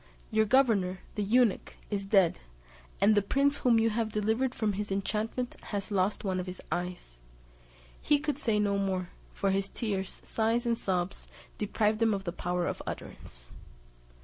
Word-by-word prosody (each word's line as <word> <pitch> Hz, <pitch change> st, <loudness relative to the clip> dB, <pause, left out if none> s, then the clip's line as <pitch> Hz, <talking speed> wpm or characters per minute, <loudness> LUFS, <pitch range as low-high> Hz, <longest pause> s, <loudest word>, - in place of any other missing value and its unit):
Your 220 Hz, 0 st, +3 dB
governor, 210 Hz, -7 st, +3 dB
the 210 Hz, -, -2 dB
eunuch, 225 Hz, +1 st, +2 dB, 0.2 s
is 200 Hz, -1 st, -2 dB
dead, 195 Hz, -4 st, +4 dB, 0.6 s
and 205 Hz, +2 st, +5 dB
the 205 Hz, -, +4 dB
prince 280 Hz, +8 st, +2 dB
whom 240 Hz, -2 st, +4 dB
you 225 Hz, 0 st, +3 dB
have 220 Hz, 0 st, -1 dB
delivered 220 Hz, +5 st, 0 dB
from 215 Hz, -2 st, 0 dB
his 205 Hz, +1 st, -4 dB
enchantment 215 Hz, +5 st, -2 dB
has 205 Hz, 0 st, -4 dB
lost 195 Hz, +1 st, +1 dB
one 190 Hz, -2 st, -1 dB
of 180 Hz, -, -4 dB
his 180 Hz, 0 st, -7 dB
eyes." 175 Hz, -, -4 dB, 0.8 s
He 295 Hz, -, +4 dB
could 290 Hz, -1 st, -2 dB
say 225 Hz, -7 st, +1 dB
no 200 Hz, -1 st, +1 dB
more, 185 Hz, -2 st, -1 dB, 0.2 s
for 195 Hz, -, 0 dB
his 195 Hz, +1 st, 0 dB
tears, 195 Hz, -5 st, -3 dB
sighs, 230 Hz, +2 st, 0 dB
and 235 Hz, -1 st, +2 dB
sobs, 185 Hz, -4 st, -2 dB, 0.3 s
deprived 215 Hz, +1 st, +1 dB
him 225 Hz, -2 st, +4 dB
of 195 Hz, -, -5 dB
the 170 Hz, -3 st, -4 dB
power 180 Hz, -1 st, -1 dB
of -, -, -3 dB
utterance. -, -, -8 dB
205 Hz, 170 wpm, -30 LUFS, 190-225 Hz, 0.8 s, and